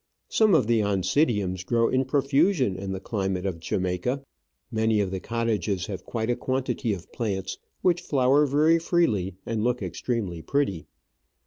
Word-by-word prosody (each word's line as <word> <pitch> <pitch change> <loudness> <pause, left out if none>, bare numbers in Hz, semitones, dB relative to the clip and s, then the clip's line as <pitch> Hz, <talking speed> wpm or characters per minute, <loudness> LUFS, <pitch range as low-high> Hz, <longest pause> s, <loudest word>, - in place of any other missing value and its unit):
Some 215 -5 +4
of 155 - +4
the 115 -1 +2
Oncidiums 100 - +1
grow 115 +3 +2
in 130 0 +1
profusion 140 - +2
in 95 +1 -5
the 95 - -3
climate 95 -2 -2
of 90 -4 -2
Jamaica. 90 +10 -2 0.5
Many 110 -1 +2
of 100 -2 0
the 95 - -3
cottages 110 -3 -1
have 95 -3 -6
quite 115 0 -2
a - - +1
quantity 130 -1 -1
of 95 -4 -6
plants, 95 -5 -3 0.2
which 175 -1 +3
flower 140 -2 +3
very 155 +4 +4
freely 110 - +1
and 110 -2 -2
look 125 +1 0
extremely 100 -9 -3
pretty. 100 - -1
115 Hz, 155 wpm, -26 LUFS, 95-135 Hz, 0.5 s, Some